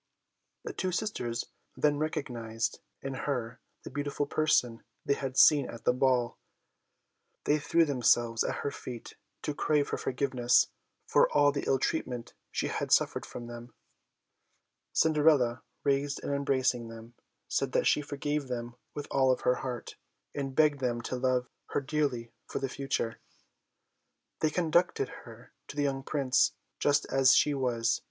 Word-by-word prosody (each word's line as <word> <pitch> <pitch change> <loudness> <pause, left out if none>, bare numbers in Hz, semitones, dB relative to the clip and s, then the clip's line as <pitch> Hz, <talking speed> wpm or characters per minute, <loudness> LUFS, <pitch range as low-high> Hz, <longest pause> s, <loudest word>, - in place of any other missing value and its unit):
The - - -5
two 185 - -2
sisters 175 - -2 0.3
then 145 -1 +2
recognised 115 -7 -2 0.2
in 135 0 -3
her 125 -4 -3 0.2
the - - -8
beautiful 145 +1 -2
person 140 -6 +1 0.2
they 140 - +3
had 135 -2 -4
seen 145 -4 +6
at 115 - -9
the - - +3
ball. 125 -2 +1 1.0
They 150 +1 +2
threw 165 +3 +3
themselves 120 -4 +2
at - - -1
her 140 - 0
feet 125 -4 -8 0.3
to 150 - -1
crave 145 0 +1
her - - -2
forgiveness 125 -2 +2 0.4
for - - +4
all 145 -1 +5
the 140 - -3
ill 135 - +3
treatment 125 -4 -2 0.2
she - - -2
had - - -3
suffered - - +3
from 120 - -7
them. 120 0 -10 1.2
Cinderella 150 -6 +3 0.2
raised 140 0 +1
and 140 - -2
embracing 130 -4 +1
them, 115 +1 -11 0.3
said - - 0
that - - +2
she - - +4
forgave 145 0 -3
them 120 -1 -5 0.2
with 145 - -4
all 130 -1 +4
her 125 - +2
heart, 125 -2 -5 0.4
and 135 -2 -4
begged 150 -2 +4
them 120 -2 -1
to 130 - -3
love 125 -1 +1 0.3
her - - +4
dearly 135 -5 -1 0.2
for - - -4
the 135 - -2
future. 130 -5 -2 1.2
They 155 - +2
conducted 175 +2 +1 0.2
her - - -13
to - - -9
the 145 - 0
young 135 -1 0
Prince, 135 -2 +2 0.3
dressed 145 0 +3
just - - -9
as 135 0 +6
she 150 - +4
was. 120 -4 +1
135 Hz, 155 wpm, -30 LUFS, 120-145 Hz, 1.2 s, seen